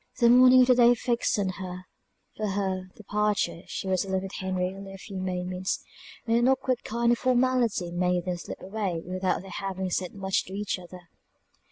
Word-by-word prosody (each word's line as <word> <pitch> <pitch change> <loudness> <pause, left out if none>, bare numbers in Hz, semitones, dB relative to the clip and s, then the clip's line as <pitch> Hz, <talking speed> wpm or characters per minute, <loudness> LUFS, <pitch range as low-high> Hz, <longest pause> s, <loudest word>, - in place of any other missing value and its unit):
The 235 -1 +5
morning 255 +1 +8
of 250 - +5
the - - +8
day 245 0 +6
fixed 240 -1 0
on 195 -2 0 0.8
for 215 - -2
her 190 -2 -2
departure 210 -4 -1
she - - -5
was 185 -1 +1
alone 190 -1 -2
with 195 - -7
Henry 185 -1 -2
only 195 0 -9
a - - -9
few 195 0 -7
moments, 185 0 -2 0.4
and 230 -1 +2
an 240 +1 +3
awkward 260 -1 +1
kind 235 +1 +1
of 240 - +2
formality 250 -7 +1
made 180 0 0
them 180 -1 -2
slip 175 - -8
away 190 -4 -3
without 185 +1 -1
their 195 - -10
having 190 -1 -3
said 180 +2 -2
much 195 -1 0
to 190 - -10
each 200 -1 -2
other. 180 0 -11
195 Hz, 190 wpm, -27 LUFS, 185-235 Hz, 0.8 s, morning